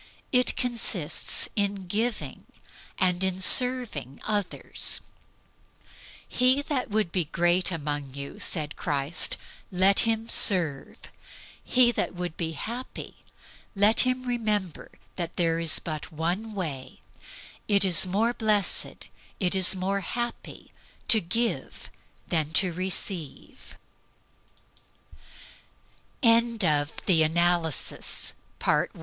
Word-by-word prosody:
It 250 -1 +2
consists 225 - 0
in 200 -2 -2
giving, 215 +5 -3 0.5
and 180 -1 +1
in 190 -1 -1
serving 240 - +3
others. 205 -3 -1 1.3
"He 255 +3 +2
that 275 -5 -3
would 210 -4 -1
be 180 -3 0
great 175 +4 +1
among 145 -4 -5
you," 140 0 -8
said 150 -3 -2
Christ, 145 +2 0 0.3
"let 190 +2 +4
him 225 0 +2
serve." 170 - +2 0.7
He 245 -1 +3
that 235 - -3
would 175 -2 -5
be 165 -2 -4
happy, 235 - -7 0.6
let 205 +3 +3
him 255 0 +4
remember 215 -8 -3 0.3
that 170 -2 -5
there 165 -1 0
is 165 -2 +5
but 155 +1 -6
one 180 +8 -4
way 145 -9 -6 0.7
"it 200 -1 +3
is 185 0 +5
more 220 +6 0
blessed, 215 -4 0 0.3
it 180 -2 0
is 190 -1 +6
more 190 +2 -2
happy, 240 +5 -6 0.4
to 220 -3 +8
give 230 +7 -4 0.4
than 160 -3 -1
to 180 +1 +3
rece 185 +1 -1
190 Hz, 95 wpm, -26 LUFS, 165-225 Hz, 1.3 s, to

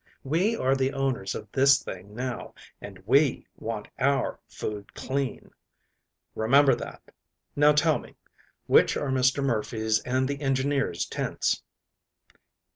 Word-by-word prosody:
We 175 +11 +1
are 135 -8 +1
the 135 +1 0
owners 135 -8 -1
of - - -7
this 135 0 +4
thing 95 +3 -9
now, 125 0 -5 0.3
and 100 -2 -9
we 135 +4 +3
want 110 -2 -5
our 135 0 +1
food 105 -1 -6
clean. 135 0 -3 0.8
Remember 135 +5 +4
that. - - -8 0.4
Now, 150 +1 +5
tell 155 +1 +3
me, - - -14 0.5
which - - +4
are 145 - -2
Mr. 130 +1 +2
Murphy's 110 -3 0
and 130 +1 0
the 140 +1 -4
engineers' 135 -7 0
tents?" - - -1
130 Hz, 125 wpm, -27 LUFS, 115-140 Hz, 0.8 s, Now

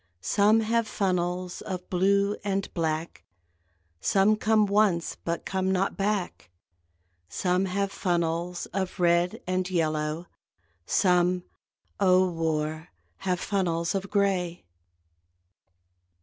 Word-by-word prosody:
Some 210 - +3
have 230 +1 +1
funnels 180 -2 -1
of 180 -2 -6
blue 200 +2 +2
and 195 -1 -2
black, 160 -1 -2 0.8
(Some 200 - +3
come 215 0 +3
once 200 -4 +2
but 170 0 -3
come 190 0 -1
not 190 +1 0
back!) 195 - -2 0.8
Some 180 - 0
have 195 +1 -1
funnels 175 -1 -1
of 190 -1 -3
red 175 0 +2
and 185 0 -1
yellow, 155 -1 -1 0.6
Some 180 -1 +2 0.6
O 185 -1 +4
war! 160 -1 -2 0.3
have 185 -2 -1
funnels 175 -3 -1
of 195 0 -3
gray. 190 -4 0
185 Hz, 105 wpm, -27 LUFS, 170-200 Hz, 0.8 s, O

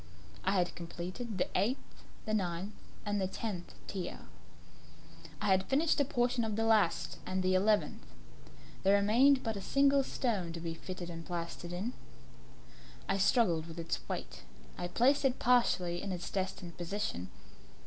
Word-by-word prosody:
I 190 - +2
had 180 -2 +2
completed 180 +6 -5
the 180 - +1
eighth, 220 +9 -1 0.2
the 215 - -2
ninth, 190 0 -1 0.3
and 205 -1 0
the 190 - +1
tenth 190 -3 -5
tier. 190 -3 -5 1.2
I - - -3
had 190 0 +3
finished 300 +4 +3
a - - +3
portion 245 -2 +1
of 220 -2 -1
the 225 - +1
last 210 -7 +2
and 185 0 -1
the 185 0 +3
eleventh; 205 +3 +2 0.8
there 195 +1 +5
remained 255 +7 +5
but 225 -2 -1
a 200 - -4
single 275 +5 +4
stone 210 -10 -1
to 170 - -5
be 165 0 -3
fitted 175 +1 -6
and 165 0 -6
plastered 170 0 -5
in. 195 +8 -3 1.1
I 195 0 +1
struggled 185 -7 +3
with 165 0 -9
its 165 0 -2
weight; - - -4 0.3
I 175 - -3
placed 260 +10 +3
it 265 -1 +2
partially 185 -8 +3
in 200 - -3
its 175 -1 -4
destined 185 -3 -3
position. 175 - -3
195 Hz, 160 wpm, -33 LUFS, 175-230 Hz, 1.2 s, there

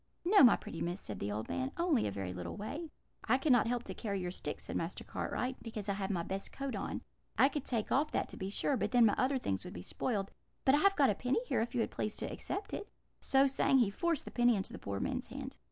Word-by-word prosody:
"'No, 400 +3 +7
my 245 - +9
pretty 165 - -7
miss,' 175 +3 -2
said 105 -3 -6
the 100 - -2
old 105 +1 -3
man; 260 +1 -2
'only 335 -8 +2
a - - -2
very 95 -2 -4
little 90 -1 -5
way.' 290 +11 -5 0.4
"'I - - +4
cannot 255 -5 +4
help 240 0 0
to - - -6
carry 200 -4 -3
your 180 -1 -3
sticks,' - - -4
said - - -5
Master - - -3
Cartwright, 255 +1 -3
'because 220 -3 -6
I 200 - +1
have 195 -1 -3
my 175 -4 0
best 195 +3 -4
coat 275 -1 -4
on. - - -4 0.3
I 270 - +7
could 290 -1 -4
take 230 -4 -1
off 290 +4 +3
that, - - -1
to - - -8
be 190 - -3
sure, 270 +7 0
but - - 0
then 240 -2 +7
my 210 - +4
other 265 +2 +2
things 95 - -2
would - - -8
be 90 - -6
spoiled; 200 - -2 0.3
but 265 - +6
I 290 - +5
have 395 +4 +4
got 275 -6 +5
a - - +1
penny 250 - 0
here, 485 - +1
if 235 +2 -3
you 230 - +3
please 210 - -3
to - - -4
accept 400 +1 -4
it.' 410 - -4 0.3
So 270 0 +4
saying, 270 0 +3
he 235 -6 +4
forced 335 - 0
the - - -7
penny 240 -1 +4
into 195 - -3
the - - -7
poor 100 0 -4
man's - - -2
hand. - - -7
240 Hz, 265 wpm, -34 LUFS, 195-270 Hz, 0.4 s, my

